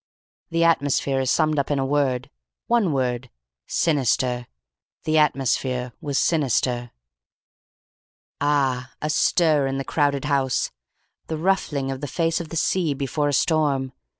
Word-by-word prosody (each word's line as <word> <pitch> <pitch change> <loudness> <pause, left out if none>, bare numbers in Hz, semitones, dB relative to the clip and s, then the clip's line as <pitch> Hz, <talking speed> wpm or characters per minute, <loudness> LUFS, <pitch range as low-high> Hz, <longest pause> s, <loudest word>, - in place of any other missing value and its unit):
"The 165 0 +1
atmosphere 140 -4 +2
is 130 -1 0
summed 155 +1 +2
up 140 - -1
in 145 - +1
a 135 - 0
word. 135 -2 0 0.3
One 230 -7 +2
word. 130 -2 -1 0.4
Sinister. 125 -5 +1 0.6
The 155 0 +2
atmosphere 130 -3 0
was 145 -3 -2
sinister. 125 -5 +1 1.5
"AA! 135 -3 +1
A 150 - -3
stir 155 -3 +3
in 135 0 -2
the 135 - -2
crowded 145 -2 0
house. 135 -3 0 0.6
The 160 - -3
ruffling 155 -6 0
of 135 0 -6
the 145 - -3
face 165 +4 0
of 165 - -8
the - - -7
sea 165 -4 +1
before 145 +2 -1
a - - -1
storm. 140 -4 +1
140 Hz, 140 wpm, -23 LUFS, 130-155 Hz, 1.5 s, stir